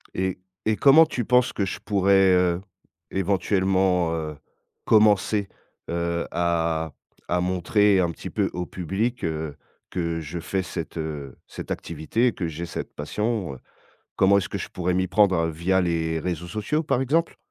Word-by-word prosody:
Et 95 0 -1 0.3
et 110 -1 +2
comment 150 +4 +7
tu 125 -7 -3
penses 125 +2 +3
que 100 - 0
je 90 - -4
pourrais, 95 -1 +4
heu, 90 -1 +2 0.5
éventuellement, 95 -2 +1
heu, 80 -2 -4 0.5
commencer, 105 -1 +4 0.4
heu, 85 0 -1
à 85 -2 0 0.3
à 90 0 +1
montrer 95 +3 +3
un 85 -2 +1
petit 80 - -8
peu - - 0
au 90 - -3
public, 100 +8 -2
heu, 80 -2 -3 0.4
que 85 -2 -2
je 80 +3 -5
fais 95 +3 -2
cette, 85 -2 -6
heu, 75 -4 -5
cette - - -8
activité 85 +10 -1
et 120 - +1
que 85 - -3
j'ai 80 +2 -5
cette - - -6
passion, 105 - -2
heu, - - -13 0.6
comment 100 +1 +5
est-ce 100 - -1
que - - -3
je - - -6
pourrais 90 0 -1
m'y 95 +1 +1
prendre, 95 -3 +3
via 85 +4 +1
les 80 -2 0
réseaux 85 0 -3
sociaux, 110 - -1
par 130 -4 +1
exemple? 160 +6 +1
90 Hz, 165 wpm, -24 LUFS, 85-100 Hz, 0.6 s, comment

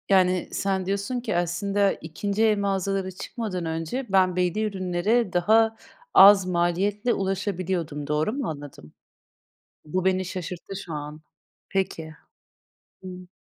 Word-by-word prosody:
Yani 185 -2 +3
sen 190 -1 -1
diyorsun 200 +6 -2
ki, 230 -5 -3
aslında 195 +3 +1
2'nci 200 +7 -3
el 215 -1 +4
mağazalara 195 -1 -1
çıkmadan 185 -1 -5
önce 165 +11 -3
ben 185 -2 +3
belli 180 +3 0
ürünlere 195 +2 0
daha 220 +5 +3 0.4
az 195 -1 +8
maliyetle 185 +6 0
ulaşabiliyordum. 185 -6 -2
Doğru 150 +7 0
mu 270 -3 -3
anladım? 145 - -9 0.9
Bu 180 +4 -2
beni 185 0 +2
şaşırttı 180 0 -6
şu 170 - -7
an. 150 +1 -6 0.5
Peki, 165 -5 -2 0.9
hımm. 180 -1 -9
185 Hz, 120 wpm, -25 LUFS, 175-200 Hz, 0.9 s, az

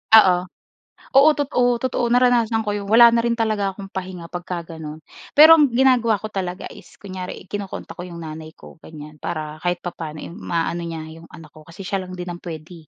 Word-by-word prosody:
Oo. 185 -5 +7 0.7
Oo, 275 +3 +7
totoo, 250 -4 +1
totoo 240 0 -1
naranasan 240 -2 +3
ko 210 - -2
'yon 205 -1 -4
wala 235 +2 +7
na 235 - +2
rin 235 0 0
talaga 215 -4 -1
akong 195 0 -10
pahinga 180 -3 -7
pagka 175 -1 -5
gano'n. 160 -1 -9 0.3
Pero 315 +2 +9
ang 295 - +6
ginagawa 245 -2 +3
ko 215 - -5
talaga 185 -2 -4
is - - -15
kunyari 185 -3 -8
kino-contact 195 -4 -6
ko 180 - -5
'yong 170 -1 -9
nanay 155 0 -9
ko - - -15
ganyan 150 -1 -12
para 155 +1 -5
kahit 175 +1 -2
papaano, 160 -3 -6
eh, - - -8
maano 170 -2 -3
niya 165 -1 -6
'yong 165 +1 -13
anak 155 -2 -14
ko 155 -1 -17
kasi 185 +4 -10
siya 195 +1 -2
lang 185 - -8
din 180 0 -6
ang 175 - -8
puwede, 160 -1 -10
185 Hz, 200 wpm, -21 LUFS, 165-225 Hz, 0.7 s, Pero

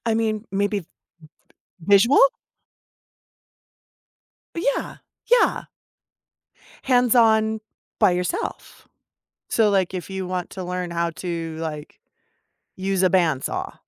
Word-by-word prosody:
I 225 - +2
mean, 220 -1 -1
maybe 200 +1 0
v 165 - -17 0.9
visual? 205 - +5 2.4
Yeah, 280 -4 -2 0.3
yeah. 485 0 +3 1.2
Hands 250 -2 +3
on, 220 -2 +3 0.4
by 210 -3 +6
yourself, 180 0 -4 0.6
so, 220 -2 +2
like, 190 -2 +1
if 185 0 -5
you 190 -1 -4
want 180 -1 -3
to 190 - -6
learn 180 0 -4
how 170 0 -1
to, 165 -1 -5
like, 155 -2 -6 0.8
use 190 0 -1
a 185 - +5
band 160 -8 +2
saw - - -4
190 Hz, 110 wpm, -23 LUFS, 175-220 Hz, 2.4 s, by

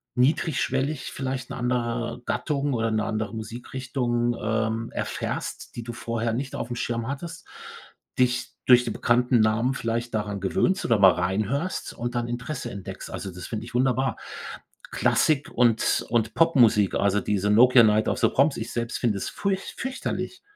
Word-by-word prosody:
niedrigschwellig 135 +1 0
vielleicht 130 -1 -4
'ne - - -4
andere 120 -1 -1
Gattung 145 -2 -1
oder 115 -1 0
'ne 110 -1 0
andere 110 -1 -2
Musikrichtung, 120 +1 -2
ähm, 110 +1 -1
erfährst, - - -4
die 120 - -5
du 120 0 -6
vorher 115 -1 -2
nicht 130 +3 -3
aufm 120 +1 -4
Schirm 115 0 -2
hattest, 165 +5 -6 0.7
dich 125 -1 +1
durch 125 -1 +7
die - - -3
bekannten 120 0 +2
Namen 110 +4 +2
vielleicht 115 0 -3
daran 105 -2 -2
gewöhnst 185 - +1
oder 115 - +3
mal 95 -1 +8
reinhörst 110 - -1
und 120 +1 -4
dann 120 0 -1
Interesse 125 +3 -4
entdeckst. 100 -2 -8
Also, 95 - -5
das 90 - -8
finde 110 0 -4
ich 120 - -12
wunderbar. 130 +1 +1 0.7
Klassik 145 -2 +2
und 115 -2 +2
und 115 -1 +1
Popmusik, 120 - +4
also 100 0 +2
diese 105 0 0
„Nokia 125 +2 +7
Night 110 0 +3
of - - -1
the 115 - +4
Proms“. 140 +3 +2
Ich 110 - -5
selbst 120 0 -2
finde 110 -5 +1
es - - -3
furcht 195 -1 -3
fürchterlich, 265 +7 -4
120 Hz, 160 wpm, -25 LUFS, 110-130 Hz, 0.7 s, mal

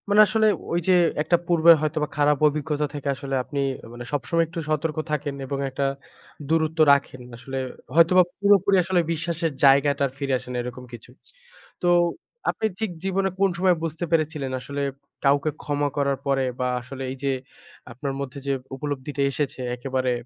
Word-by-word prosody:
মানে 205 +1 +7
আসলে 220 +2 +2 0.2
ঐ - - -1
যে 185 - +5 0.3
একটা 165 +3 +3
পূর্বের 170 -1 +7
হয়তোবা 155 0 -1
খারাপ 145 0 +3
অভিজ্ঞতা 150 0 -1
থেকে 145 -1 -5
আসলে 135 0 -4
আপনি 140 +2 -5 0.3
মানে 120 0 -8
সবসময় 165 +4 +1
একটু 165 - -6
সতর্ক 155 0 -1
থাকেন। 145 -1 -2
এবং 140 +1 -3
একটা 135 +1 -2 0.6
দূরত্ব 160 +1 0
রাখেন 135 -2 -1 0.2
আসলে 135 +2 -6 0.4
হয়তোবা 175 +2 +6 0.2
পুরোপুরি 200 -1 +4
আসলে 180 +1 +1
বিশ্বাসের 165 0 -1
জায়গাটা 140 +1 +5
আর - - -11
ফিরে 135 -1 -1
আসে 125 - -11
না 125 - -3
এরকম 125 +1 -7
কিছু। 120 0 -10 0.7
তো 175 - 0 0.6
আপনি - - -1
ঠিক 220 -4 -1
জীবনে 195 0 0
কোন 195 0 +4
সময় 185 0 +3
বুঝতে 165 +1 -3
পেরেছিলেন? 155 -4 0
আসলে 140 +2 -5 0.4
কাউকে 140 +2 +3
ক্ষমা 145 0 0
করার 140 -1 +1
পরে 135 -1 +2 0.2
বা 125 - 0
আসলে 135 +2 -8
এই - - -5
যে 140 - +1 0.6
আপনার 135 +3 -4
মধ্যে 140 0 -5
যে 140 - +2 0.2
উপলব্ধিটা 140 0 -4
এসেছে 140 -1 -3 0.2
একেবারে 130 0 -1
145 Hz, 165 wpm, -24 LUFS, 135-165 Hz, 0.7 s, মানে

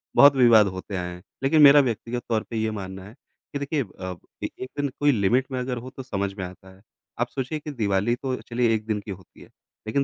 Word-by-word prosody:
बहुत 140 0 +8
विवाद 115 -5 +6
होते 95 +1 -6
आए 90 0 -4
हैं, 90 - -11 0.2
लेकिन 150 +3 +4
मेरा 145 0 +9
व्यक्तिगत 120 0 -3
तौर 110 -2 +1
पे 115 - -4
ये 110 0 0
मानना 95 -2 -6
है 105 - -12 0.4
कि 140 - -2
देखिए 140 +1 -1
अब 95 -3 -8 0.2
एक 130 - -5
दिन 145 -1 0
कोई 145 0 +4
लिमिट 120 +4 +2
में 130 - -2
अगर 125 0 -3
हो 120 +2 -7
तो 130 0 -9
समझ 100 -5 -2
में 95 - -4
आता 95 +1 -12
है। 95 - -22 0.4
आप 120 - +1
सोचिए 140 +3 -3
कि 150 0 -7
दिवाली 105 -1 +1
तो 130 0 -3
चलिए 120 -1 +1
1 110 0 -4
दिन 105 -2 0
की 105 - -5
होती 95 -1 -12
है - - -14 0.4
लेकिन 140 +6 +1
115 Hz, 240 wpm, -25 LUFS, 100-130 Hz, 0.4 s, मेरा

